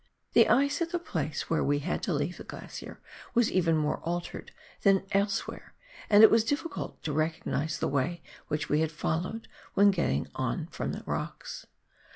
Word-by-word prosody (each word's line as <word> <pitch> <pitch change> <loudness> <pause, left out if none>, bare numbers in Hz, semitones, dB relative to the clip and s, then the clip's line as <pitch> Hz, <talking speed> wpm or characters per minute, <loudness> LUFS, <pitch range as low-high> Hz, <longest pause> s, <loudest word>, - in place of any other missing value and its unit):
The - - +6
ice 280 +5 +3
at 335 - 0
the 350 - +1
place 315 - -3
where 165 - +1
we 145 0 +2
had 150 +5 -2
to 180 - -1
leave 170 +5 -2
the - - -8
glacier - - -9 0.4
was 240 -2 +4
even 165 -3 +3
more 150 -1 0
altered 175 +1 -4 0.3
than 195 -1 +4
elsewhere, 200 0 -1 0.3
and 210 +1 +8
it 220 - +10
was 225 -1 +5
difficult 290 +7 -3
to 150 - -2
recognise 155 0 -1
the - - -1
way 155 +5 -1 0.2
which 150 0 -2
we 150 - +2
had 160 -1 0
followed 170 +7 -2 0.3
when 200 +1 +6
getting 170 - 0
on - - -2
from - - -3
the - - -6
rocks. - - -5
175 Hz, 180 wpm, -29 LUFS, 155-215 Hz, 0.4 s, it